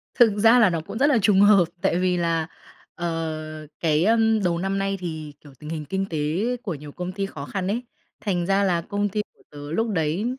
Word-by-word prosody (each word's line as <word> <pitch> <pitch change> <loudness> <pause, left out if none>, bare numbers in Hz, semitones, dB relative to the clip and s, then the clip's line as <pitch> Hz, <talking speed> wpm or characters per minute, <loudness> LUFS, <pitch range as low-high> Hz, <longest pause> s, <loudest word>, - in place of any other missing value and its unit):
Thực 230 -5 +5
ra 230 +3 +6
là 215 -5 +6
nó 165 -2 -2
cũng 205 - -7
rất 280 +3 +4
là 280 -6 +4
trùng 195 -1 +4
hợp, 205 -4 +6 0.2
tại 190 -3 +1
vì 180 -1 +1
là, 165 -1 0 0.5
ờ, 155 -2 -4
cái, 160 0 +2
ơm, 225 -2 +3
đầu 170 -1 +1
năm 195 +2 -1
nay 195 0 -1
thì, 155 -4 -6
kiểu, 145 -2 -15
tình 150 - -9
hình 155 -2 -4
kinh 195 +4 -2
tế 160 - -3 0.5
của 190 -7 -3
nhiều 145 0 -10
công 180 +3 -5
ty 195 0 -3
khó 145 -7 -7
khăn 190 +1 -3
ấy, 235 +5 -1 0.4
thành 180 -5 -1
ra 195 +1 +2
là 175 -3 +1
công 205 +2 -2
ty 210 +2 -1
của - - -27
tớ 145 0 -9
lúc 225 +6 0
đấy, 165 +2 0
180 Hz, 230 wpm, -24 LUFS, 160-205 Hz, 0.5 s, ra